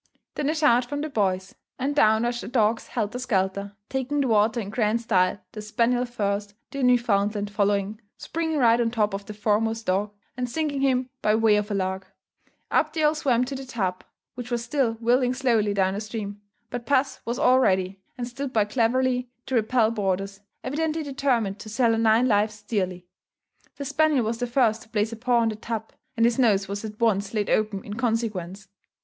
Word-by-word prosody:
Then 290 Hz, -1 st, -1 dB
a 310 Hz, -, 0 dB
shout 255 Hz, -6 st, +4 dB
from 290 Hz, +3 st, -4 dB
the 310 Hz, -, -3 dB
boys; 190 Hz, -5 st, 0 dB, 0.2 s
and 280 Hz, +3 st, -1 dB
down 220 Hz, -4 st, +4 dB
rushed 240 Hz, 0 st, -1 dB
the -, -, -7 dB
dogs 225 Hz, -2 st, +1 dB
helter 225 Hz, +1 st, -3 dB
skelter, 200 Hz, -4 st, -1 dB
taking 265 Hz, +2 st, -2 dB
the 265 Hz, -, 0 dB
water 220 Hz, +1 st, +3 dB
in 205 Hz, -3 st, -5 dB
grand 220 Hz, 0 st, +1 dB
style, 195 Hz, -4 st, +1 dB
the 215 Hz, -, -7 dB
spaniel 235 Hz, +4 st, +1 dB
first, 205 Hz, -3 st, -3 dB, 0.2 s
the 275 Hz, -, -4 dB
Newfoundland 210 Hz, -4 st, +2 dB
following, 205 Hz, +1 st, 0 dB, 0.2 s
springing 320 Hz, -1 st, -2 dB
right 235 Hz, -3 st, +4 dB
on 230 Hz, -, +1 dB
top 215 Hz, -3 st, 0 dB
of 200 Hz, 0 st, -5 dB
the 210 Hz, -, -7 dB
foremost 220 Hz, +2 st, 0 dB
dog, 195 Hz, +3 st, +1 dB, 0.3 s
and 250 Hz, -1 st, -3 dB
sinking 290 Hz, 0 st, -2 dB
him 255 Hz, -2 st, +1 dB
by 210 Hz, 0 st, +3 dB
way 220 Hz, -1 st, +4 dB
of 210 Hz, 0 st, -1 dB
a 205 Hz, -, -1 dB
lark. 190 Hz, 0 st, -2 dB, 0.6 s
Up 305 Hz, -, +2 dB
they 315 Hz, -1 st, -1 dB
all 300 Hz, 0 st, +4 dB
swam 255 Hz, -5 st, +1 dB
to 270 Hz, -, -6 dB
the 270 Hz, 0 st, -5 dB
tub, 200 Hz, -8 st, -3 dB, 0.3 s
which 245 Hz, -1 st, -7 dB
was 240 Hz, -1 st, -1 dB
still 245 Hz, -1 st, 0 dB
whirling 245 Hz, +2 st, +1 dB
slowly 230 Hz, -6 st, +2 dB
down 195 Hz, 0 st, +1 dB
stream; 210 Hz, -2 st, -6 dB, 0.3 s
but 245 Hz, -1 st, -5 dB
puss 275 Hz, -1 st, +1 dB
was 235 Hz, +1 st, -3 dB
all 255 Hz, +1 st, +4 dB
ready, 190 Hz, -4 st, +1 dB, 0.2 s
and 240 Hz, -1 st, -3 dB
stood 270 Hz, +2 st, -5 dB
by 215 Hz, -4 st, +2 dB
cleverly 250 Hz, +3 st, +1 dB, 0.2 s
to 265 Hz, -, -6 dB
repel 225 Hz, -1 st, +3 dB
boarders, 195 Hz, -2 st, -2 dB, 0.2 s
evidently 315 Hz, +4 st, -1 dB
determined 250 Hz, -8 st, 0 dB
to 215 Hz, -, -9 dB
sell 230 Hz, +1 st, +2 dB
her 225 Hz, -, +1 dB
nine 225 Hz, +2 st, +4 dB
lives 210 Hz, -1 st, +1 dB
dearly. 185 Hz, -4 st, -2 dB, 0.7 s
The 280 Hz, -, -6 dB
spaniel 290 Hz, -3 st, +2 dB
was 225 Hz, +1 st, -2 dB
the 245 Hz, -, -1 dB
first 235 Hz, -3 st, +2 dB
to 230 Hz, -, -16 dB
place 215 Hz, 0 st, 0 dB
a -, -, -5 dB
paw 240 Hz, +1 st, +2 dB
on 225 Hz, -, +2 dB
the 215 Hz, -, -4 dB
tub; 225 Hz, 0 st, -5 dB, 0.3 s
and 230 Hz, -, +4 dB
his 235 Hz, +2 st, +2 dB
nose 200 Hz, -6 st, +3 dB
was 200 Hz, +2 st, -5 dB
at 215 Hz, -1 st, -7 dB
once 205 Hz, -2 st, +1 dB
laid 210 Hz, -1 st, 0 dB
open 210 Hz, -2 st, 0 dB
in 205 Hz, -, -7 dB
consequence. 210 Hz, -5 st, -2 dB
225 Hz, 200 wpm, -25 LUFS, 205-250 Hz, 0.7 s, shout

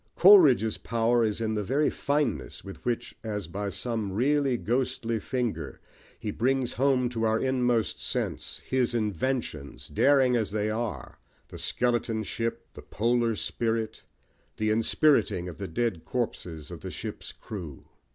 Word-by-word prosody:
Coleridge's 150 Hz, -, +7 dB
power 115 Hz, +1 st, +2 dB
is 110 Hz, -1 st, 0 dB
in 110 Hz, -1 st, -1 dB
the 105 Hz, -1 st, -1 dB
very 140 Hz, +9 st, +1 dB
fineness 140 Hz, -5 st, -1 dB
with 95 Hz, -, -10 dB
which, 120 Hz, 0 st, -2 dB
as 105 Hz, -3 st, -3 dB
by 100 Hz, +4 st, -3 dB
some 110 Hz, -2 st, -2 dB
really 135 Hz, +4 st, +2 dB
ghostly 115 Hz, -1 st, -1 dB
finger, 125 Hz, 0 st, -3 dB, 0.4 s
he 105 Hz, -, -4 dB
brings 130 Hz, +3 st, 0 dB
home 130 Hz, -1 st, +2 dB
to 115 Hz, -2 st, -3 dB
our 110 Hz, 0 st, +3 dB
inmost 125 Hz, -3 st, +1 dB
sense -, -, -3 dB
his 125 Hz, -2 st, +1 dB
inventions, 105 Hz, -, -2 dB
daring 135 Hz, -3 st, +4 dB
as 110 Hz, -3 st, 0 dB
they 105 Hz, +1 st, -1 dB
are 110 Hz, -3 st, -4 dB, 0.3 s
the -, -, -9 dB
skeleton 120 Hz, -2 st, 0 dB
ship, 115 Hz, +3 st, -3 dB
the -, -, -10 dB
polar 115 Hz, 0 st, +1 dB
spirit, 110 Hz, 0 st, -2 dB, 0.6 s
the 110 Hz, 0 st, +1 dB
inspiriting 115 Hz, -, +3 dB
of 90 Hz, -, -8 dB
the 100 Hz, -, -3 dB
dead 90 Hz, -1 st, -1 dB
corpses 85 Hz, -10 st, -4 dB
of -, -, -8 dB
the -, -, -5 dB
ship's -, -, -6 dB
crew. 85 Hz, -10 st, -8 dB
115 Hz, 145 wpm, -28 LUFS, 105-125 Hz, 0.6 s, Coleridge's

